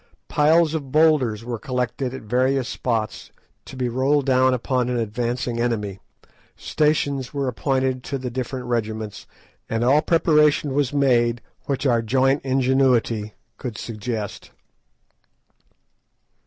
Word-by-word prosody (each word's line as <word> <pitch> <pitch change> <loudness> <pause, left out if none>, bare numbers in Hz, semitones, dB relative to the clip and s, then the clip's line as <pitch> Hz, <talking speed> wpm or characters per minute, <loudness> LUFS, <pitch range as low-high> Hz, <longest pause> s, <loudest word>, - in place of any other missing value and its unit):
Piles 155 +2 +3
of 140 -5 -4
boulders 145 -8 +3
were 120 -2 -4
collected 125 +1 -2
at 130 -2 -8
various 130 +3 +1
spots 115 -3 -3 0.4
to - - -10
be 130 -1 -1
rolled 135 +4 +1
down 130 -1 +4
upon 125 0 0
an 125 - -1
advancing 120 +2 -2
enemy, 105 -5 -2 0.6
stations 145 -3 0
were 140 -1 -1
appointed 130 0 -1
to 140 - -3
the 125 -2 -5
different 130 +1 -4
regiments, 110 -3 -3 0.4
and 115 +1 -1
all 140 +5 +4
preparation 150 -4 +3
was 140 -2 +1
made 120 -4 +2 0.3
which 140 0 -2
our 120 -3 +3
joint 135 +4 +2
ingenuity 130 -5 +1 0.2
could 120 -5 -5
suggest. 110 -2 -5
130 Hz, 125 wpm, -22 LUFS, 120-135 Hz, 0.6 s, down